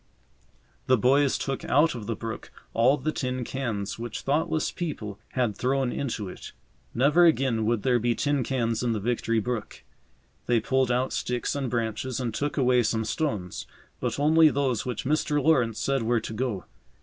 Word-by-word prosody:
The 130 - +5
boys 135 +4 +3
took 135 -1 -3
out 150 +4 +3
of 115 -4 -7
the 115 - -1
brook 115 +1 -6 0.2
all 125 +5 +4
the 155 - -2
tin 130 -3 -2
cans 115 -6 -3
which 120 0 -5
thoughtless 160 +2 0
people 110 - -5
had 120 -5 0
thrown 130 +2 0
into 115 -7 -3
it. 90 - -9 0.4
Never 150 +8 +5
again 130 -8 +2
would 115 -3 0
there 125 -2 +3
be 120 +1 +1
tin 145 -2 0
cans 115 -3 -1
in 120 -2 0
the 110 - -2
Victory 115 +1 0
brook. 115 0 -4 0.6
They 120 -1 +3
pulled 130 +1 +1
out 125 +2 0
sticks 125 -1 -1
and 140 -3 -2
branches 115 +2 -2
and 120 -4 -2
took 145 +6 -2
away 125 -2 +4
some 110 -1 0
stones, 110 - -3 0.3
but - - -2
only 155 +2 +6
those 135 -5 -1
which 125 -4 -3
Mr. 150 +1 +1
Lawrence 130 -7 +2
said 135 -1 0
were 115 +1 +1
to 110 - -6
go. 110 -5 -2
125 Hz, 175 wpm, -26 LUFS, 115-140 Hz, 0.6 s, only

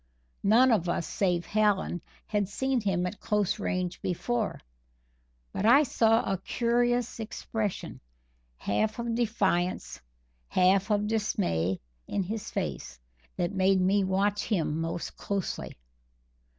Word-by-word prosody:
None 240 +5 +5
of 180 -6 +2
us, 170 - 0
save 180 -3 0
Hallen, 205 -4 +1 0.2
had 205 -3 -1
seen 265 +3 0
him 185 -4 0
at 180 +3 -5
close 210 -3 0
range 180 -1 -2
before; 225 +5 -1 0.9
but - - -2
I 255 +7 +7
saw 225 -4 +3
a 195 -2 -1
curious 240 +3 0
expression, 220 -2 -4 0.6
half 215 - 0
of 235 -1 -2
defiance, 190 - 0 0.5
half 190 - +3
of 210 -1 +2
dismay, 185 - 0 0.3
in 200 - -1
his 210 +3 -4
face, 65 - -4 0.4
that 175 +3 -1
made 190 0 +3
me 195 +2 +3
watch 200 +2 +1
him 165 -6 0
most 165 +1 -4
closely. 200 - -3
200 Hz, 125 wpm, -28 LUFS, 180-225 Hz, 0.9 s, I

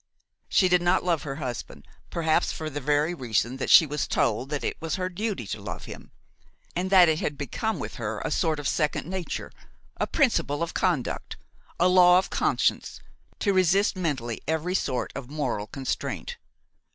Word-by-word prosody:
She 185 - +4
did 180 -1 +3
not 175 0 +2
love 170 -4 +1
her 135 -2 -5
husband, 125 -6 -6 0.2
perhaps 160 -2 +1
for 155 -1 -5
the 145 +1 -4
very 150 +4 +1
reason 125 -3 -1
that 135 - -3
she 165 - +9
was 150 -1 -2
told 120 +4 0
that 150 -1 -3
it - - -1
was 165 -1 -2
her 185 -1 -2
duty 200 - -3
to 95 - -5
love - - -6
him, - - -10 0.7
and 180 +2 -1
that 185 -2 +7
it 160 0 +2
had 145 - -2
become 205 - -2
with 150 - -6
her 110 -3 -3
a - - -2
sort 160 -3 +1
of 145 - -2
second 150 -2 0
nature, 185 +1 -4 0.5
a - - -1
principle 195 - +1
of 170 - -4
conduct, 170 -9 -1 0.4
a 175 - +5
law 180 -1 +7
of 185 - 0
conscience, - - 0 0.4
to 200 - +1
resist 190 +3 +3
mentally 135 -11 -2
every 160 +3 -1
sort 130 -9 -1
of 135 -2 -7
moral 130 -8 -2
constraint. 135 +2 -4
155 Hz, 180 wpm, -26 LUFS, 135-180 Hz, 0.7 s, she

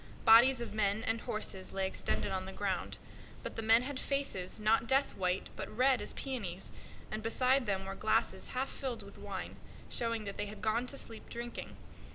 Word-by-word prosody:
Bodies 240 +3 +8
of 235 - -5
men 210 0 +1
and 225 0 0
horses 195 -3 -3
lay 195 0 0
extended 190 +1 -1
on 190 0 -2
the - - -5
ground; 195 -1 -2 0.5
but - - -5
the - - -2
men 225 +2 +5
had 270 0 -3
faces, 275 -10 -1
not 220 +2 +3
death 270 +2 +3
white, 185 0 0
but - - -5
red 255 +3 +3
as - - -4
roses, 195 -9 -4 0.4
and 215 - -3
beside 255 +3 +3
them 190 -1 0
were 195 - -4
glasses - - +1
half 265 +1 0
filled 250 -5 -3
with 200 0 -12
wine, - - -5 0.3
showing 230 -2 0
that 200 -1 -6
they 205 - -2
had 210 +1 -8
gone 230 +3 +1
to 275 - -3
sleep 225 -4 -6
drinking. 235 0 -6
225 Hz, 195 wpm, -34 LUFS, 195-250 Hz, 0.5 s, Bodies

